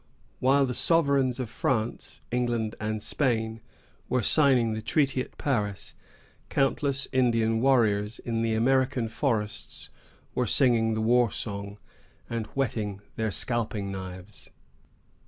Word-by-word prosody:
While 135 +2 +4
the 125 - -3
sovereigns 140 -5 +2
of 125 - -2
France, 115 0 -2
England, 120 -3 0
and 110 0 -3
Spain, 115 -5 -1 0.5
were 125 -2 +1
signing 130 -4 +4
the 110 - -4
treaty 135 +3 +1
at - - -9
Paris, 105 -8 -2 0.6
countless 135 0 +1
Indian 115 -3 +2
warriors 110 -5 +2
in 115 -1 -3
the 115 -1 +1
American 130 +1 +2
forests 110 -4 -3 0.4
were 125 - 0
singing 115 -3 +3
the 110 - -1
war 120 +1 +4
song, 100 -1 -5 0.5
and 115 -2 -3
whetting 105 -7 -2
their 110 -1 -1
scalping 110 -3 -2
knives. 95 +1 -8
115 Hz, 120 wpm, -27 LUFS, 110-130 Hz, 0.6 s, While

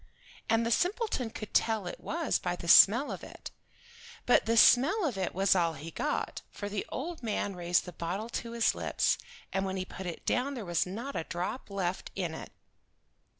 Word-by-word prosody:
And 225 +1 +3
the 230 - -1
simpleton 360 - 0
could 215 -1 -8
tell 220 -4 +2
it 175 - -6
was 330 -1 -1
by 180 -2 -2
the 170 - -8
smell 230 +10 +7
of - - -6
it. - - -10 0.7
But 245 - +4
the 230 +1 +2
smell 305 - +6
of 265 -8 -1
it 190 -3 -3
was 195 0 +3
all 170 -3 +2
he 155 +3 -8
got, - - -2
for 205 - -6
the 205 -1 -3
old 330 +6 -5
man 210 -4 -2
raised 175 0 +1
the 180 - -8
bottle 180 +7 -4
to 235 0 -5
his 235 -1 +2
lips, - - 0 0.3
and 195 - 0
when 190 0 -3
he 185 - -3
put 190 0 -8
it 170 - -7
down 275 +3 0
there 230 -5 -5
was 175 0 0
not 235 +9 -6
a 160 - -2
drop 180 +9 -4
left 190 -2 -3
in 175 -4 -2
it. - - -8
205 Hz, 200 wpm, -30 LUFS, 180-245 Hz, 0.7 s, smell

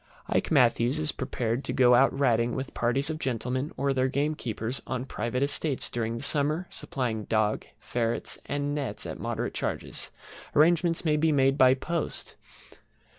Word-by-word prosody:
IKE - - +1
MATTHEWS 125 -1 +3
is 155 -1 0
prepared 125 -1 -2
to - - -2
go 125 -2 +5
out 130 +3 +6
Ratting 120 -4 +1
with 130 0 -4
parties 135 +6 0
of 155 - -5
gentlemen 130 +2 -2
or 140 0 +1
their 130 0 +2
gamekeepers 130 -4 -2
on 130 -1 -2
their - - -5
private 125 +1 -2
estates 145 0 -1
during 115 -1 -2
the 115 - -6
summer, 150 +4 +1
supplying 115 -5 -3
dog, 110 -1 0
ferrets, 115 -1 -2
and 145 0 -1
nets, 145 -3 -3
at - - -6
moderate - - -3
charges. - - -3 0.5
Arrangements 165 +2 +3
may 150 -1 +3
be 160 +1 +3
made 135 -2 +3
by 130 -2 +6
post. 165 +4 -3
135 Hz, 165 wpm, -28 LUFS, 120-145 Hz, 0.5 s, out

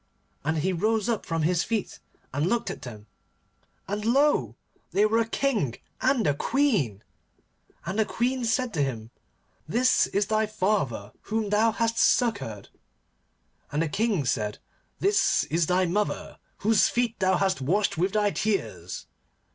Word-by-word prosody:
And 155 +3 0
he 185 +5 0
rose 215 +5 +1
up 230 -3 -1
from 165 -2 -1
his 175 +1 +2
feet, 220 -4 -3 0.3
and 145 +4 0
looked 235 +4 0
at - - -8
them, 110 -4 -9 0.8
and 205 +1 -3
lo! 275 +7 +2 0.3
they 205 - +3
were 225 +2 +2
a 230 - +1
King 225 - 0 0.3
and 255 -4 +2
a 145 - +3
Queen. 165 - 0 0.8
And 190 +5 -2
the 220 - +4
Queen 250 +3 -1
said 235 +1 0
to 155 - 0
him, 115 -5 -3 0.6
'This 245 +10 +3
is 200 +1 0
thy 215 +1 +1
father 185 - -1 0.2
whom 215 -1 -1
thou 220 +2 +4
hast 230 +1 0
succoured.' 200 - +1 1.0
And 150 +2 +1
the 165 - -2
King 205 - 0
said, 105 -3 -1 0.4
'This 405 +1 +3
is 165 -1 +2
thy 185 +1 +2
mother 205 +4 -2 0.3
whose 220 -2 +5
feet 240 -2 -1
thou 185 -1 +3
hast 190 -6 0
washed 195 +10 +1
with 185 +4 0
thy 210 -1 +2
tears. 110 - -2
205 Hz, 155 wpm, -26 LUFS, 155-225 Hz, 1.0 s, whose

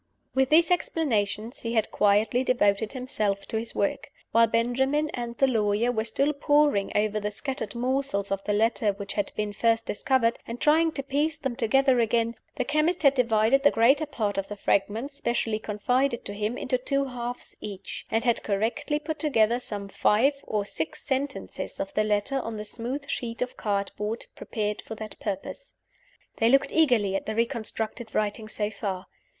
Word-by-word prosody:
With 265 0 +2
these 330 +2 +5
explanations, 235 - 0
he 230 -1 +1
quietly 210 +3 +2
devoted 215 -4 +2
himself 215 -7 -1
to 220 - -2
his 230 +1 -7
work. 200 - -1 0.2
While 230 +1 +5
Benjamin 265 +7 +1
and 240 -1 -5
the 270 - +5
lawyer 220 -1 +2
were 220 -2 -1
still 275 +6 +1
poring 290 -7 +2
over 215 0 +1
the 210 0 -2
scattered 225 +1 -5
morsels 250 -5 -1
of 195 0 -1
the - - 0
letter 215 0 +2
which 200 0 -6
had 205 - -1
been 210 -1 -2
first 225 +1 +2
discovered, 235 +1 +1
and 235 +1 -5
trying 320 +2 +4
to 275 - -3
piece 285 +3 0
them 270 -5 -3
together 260 +2 +3
again, 230 0 +2 0.2
the 255 - 0
chemist 310 +5 +1
had 280 -1 +6
divided 235 0 +3
the 285 - +6
greater 270 +7 +3
part 210 -8 -1
of 195 - -3
the 205 - -6
fragments 220 +8 0
specially 230 -4 -1
confided 240 +5 0
to 200 - -5
him 210 +3 -2
into 255 -1 -1
two 275 +2 0
halves 245 -1 -6
each; 200 -2 -7
and 225 0 +1
had 240 -2 +2
correctly 220 +8 -1
put 310 +1 -5
together 240 -6 +2
some 205 -5 -5
five 220 +7 +3
or 210 -2 -1
six 160 -5 -4
sentences 275 0 -3
of 195 - -4
the 215 - +2
letter 215 +6 +1
on 230 -3 -5
the 210 - -5
smooth 250 +7 -5
sheet 230 -3 -4
of 250 - -7
cardboard 210 +2 -2
prepared 210 -1 -3
for 220 - -8
that 215 0 -8
purpose. 205 - -5 0.6
They 225 - +3
looked 275 +2 +4
eagerly 240 -11 +3
at - - -3
the 215 - -2
reconstructed 230 -1 -2
writing 215 +1 -1
so 210 -1 -2
far. 200 -2 -4
230 Hz, 180 wpm, -27 LUFS, 210-270 Hz, 0.6 s, had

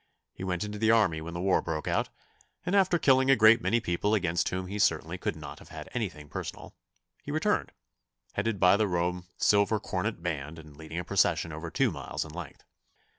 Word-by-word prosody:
He - - -8
went 90 -1 -1
into 105 0 -5
the 110 0 +2
army 100 -9 +3
when 85 +2 -7
the - - -3
war 95 +1 +2
broke 80 -1 -4
out, - - 0 0.6
and 180 +3 0
after 190 -3 +4
killing 130 -3 +4
a 135 - +7
great 110 0 +6
many 120 - +2
people 105 +1 0
against 85 -4 0
whom 95 0 -3
he 100 +3 -5
certainly 85 -3 +1
could - - -2
not 75 -2 -9
have - - -15
had - - -9
anything 75 -1 -4
personal, - - -7 0.5
he - - -10
returned, - - 0 0.6
headed 105 0 -1
by 90 +2 +6
the 110 -1 +2
Rome 90 0 -1
Silver 105 +1 +3
Cornet 95 -1 -3
Band 80 -2 -3
and 75 -2 -13
leading 80 +2 -8
a 90 - -2
procession 85 -3 +1
over 80 +2 -6
two - - +1
miles - - -4
in 80 - -10
length. 85 -4 -8
90 Hz, 205 wpm, -29 LUFS, 80-105 Hz, 0.6 s, a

